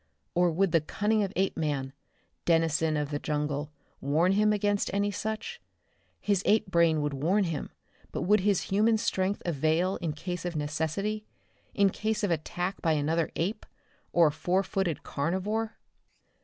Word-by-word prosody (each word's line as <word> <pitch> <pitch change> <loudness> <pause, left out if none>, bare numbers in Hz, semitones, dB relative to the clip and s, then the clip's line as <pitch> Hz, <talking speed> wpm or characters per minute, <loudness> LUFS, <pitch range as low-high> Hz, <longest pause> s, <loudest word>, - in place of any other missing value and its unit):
Or 175 0 +3
would 180 +2 +1
the 165 - +4
cunning 210 +7 0
of 195 -2 -1
Apeman, 150 -8 -1 0.5
denizen 160 -2 +2
of 150 0 -2
the 145 - -1
jungle, 150 0 -2 0.3
warn 155 +6 +2
him 210 +2 +3
against 205 -1 +1
any 205 0 +1
such? 220 - -4 0.6
His 200 -2 +1
ape 215 +1 +3
brain 165 -3 +3
would 145 -1 -1
warn 175 +10 +2
him, 165 -5 -3 0.4
but - - -3
would 210 +4 +4
his 195 -1 +2
human 220 +3 +2
strength 195 -2 -1
avail 165 +3 +1
in 165 -4 -3
case 175 +3 -5
of 175 -1 -3
necessity, 160 +8 -2 0.5
in 200 -1 +4
case 215 +1 -2
of 200 - +1
attack 175 +4 -2
by 165 -2 +2
another 155 +2 +1
ape, 200 +6 -2 0.5
or 170 -1 +5
a 150 - +4
four 185 +5 0
footed 190 -6 -2
carnivore? 200 +9 -2
175 Hz, 155 wpm, -29 LUFS, 155-205 Hz, 0.6 s, or